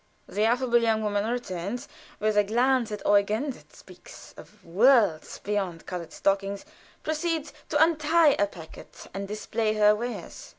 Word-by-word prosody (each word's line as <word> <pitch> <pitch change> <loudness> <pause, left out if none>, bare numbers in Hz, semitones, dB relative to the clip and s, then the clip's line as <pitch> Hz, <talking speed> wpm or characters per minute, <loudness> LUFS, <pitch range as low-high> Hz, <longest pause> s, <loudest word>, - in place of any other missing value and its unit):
The 210 +1 0
affable 240 0 +2
young 220 -1 +1
woman 205 0 0
returns, 220 -2 -4 0.3
and 215 - -5
with 215 -1 +2
a 210 - +5
glance 240 +2 +1
at 210 -1 -5
Eugen 210 +7 +2
that - - -16
speaks - - -14
of 210 -3 -16
worlds 205 - +3
beyond 195 -5 -3
colored 175 -3 -6
stockings, 195 0 -1 0.4
proceeds 315 0 -2 0.2
to 295 - +1
untie 320 0 +4
a 205 - +3
packet 165 -5 -12
and 195 +1 -5
display 215 +1 -2
her 210 0 +5
wares. 240 +3 -6
215 Hz, 155 wpm, -26 LUFS, 200-250 Hz, 0.4 s, a